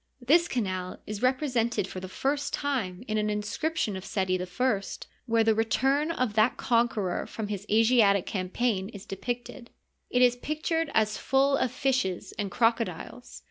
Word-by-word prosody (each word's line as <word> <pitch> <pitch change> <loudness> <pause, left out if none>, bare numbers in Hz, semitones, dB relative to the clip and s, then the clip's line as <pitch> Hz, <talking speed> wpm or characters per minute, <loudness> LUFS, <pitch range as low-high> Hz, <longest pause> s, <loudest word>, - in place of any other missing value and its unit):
This 320 +8 +4
canal 185 -6 -3
is 210 -1 -5
repre 255 +3 +2
sented 235 -7 0
for 190 - -7
the 185 0 -7
first 280 +8 -1
time 235 -10 -2
in 215 -1 0
an 210 0 0
inscription 210 +3 -1
of 190 - -6
Seti 185 -2 -1
I, 195 +4 0 0.5
where 230 -1 +3
the 220 0 +4
return 270 +7 +1
of 255 -9 -1
that 220 +3 +3
conqueror 230 -6 0
from 215 -2 -5
his 205 0 -5
Asiatic 220 -3 +4
campaign 195 +1 -1
is 200 -4 -10
depicted. 240 +4 -5 0.4
It 250 0 +3
is 245 0 +4
pictured 310 +3 -1
as 215 -1 +2
full 275 +1 +3
of 255 -3 0
fishes 255 -10 -1
and 205 -2 -1
crocodiles. 230 0 -1
225 Hz, 160 wpm, -28 LUFS, 200-255 Hz, 0.5 s, This